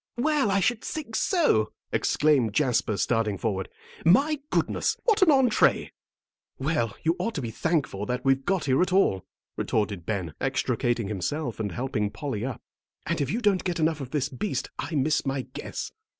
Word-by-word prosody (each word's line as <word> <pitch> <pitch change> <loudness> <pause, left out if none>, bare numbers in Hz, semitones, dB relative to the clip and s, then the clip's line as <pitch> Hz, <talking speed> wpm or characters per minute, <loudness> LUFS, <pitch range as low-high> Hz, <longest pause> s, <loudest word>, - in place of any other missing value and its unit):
"Well, 290 -2 +2
I 195 0 +2
should 230 +4 +1
think 285 -8 -5
so!" 260 - +2 0.2
exclaimed 140 -8 +2
Jasper, 115 -4 +1
starting 110 0 +1
forward. 95 -3 -2 0.3
"My 280 - +4
goodness! - - 0
What 440 -5 +2
an 375 - +6
entrée." 265 -6 +4 0.7
"Well, 130 -7 -1
you 165 +1 +2
ought 230 - -2
to 145 - -2
be 115 - -3
thankful 125 - -1
that 125 +1 -3
we've 135 0 +3
got 190 -1 0
here 135 +2 +3
at 180 - +1
all," 180 - +2 0.3
retorted 100 -5 -1
Ben, 95 -7 -2
extricating 120 -3 0
himself 115 - -3
and 105 -3 -2
helping 105 +1 -1
Polly 130 -3 -4
up; 130 -1 -5 0.4
"and - - -1
if 140 - -1
you 230 - -1
don't 205 -4 +2
get 175 -2 -2
enough 155 -1 +1
of 130 - -6
this 140 -1 0
beast, 135 +1 -3
I 165 - -3
miss 150 +2 +2
my 135 -1 -2
guess." - - -5
135 Hz, 175 wpm, -26 LUFS, 110-190 Hz, 0.7 s, an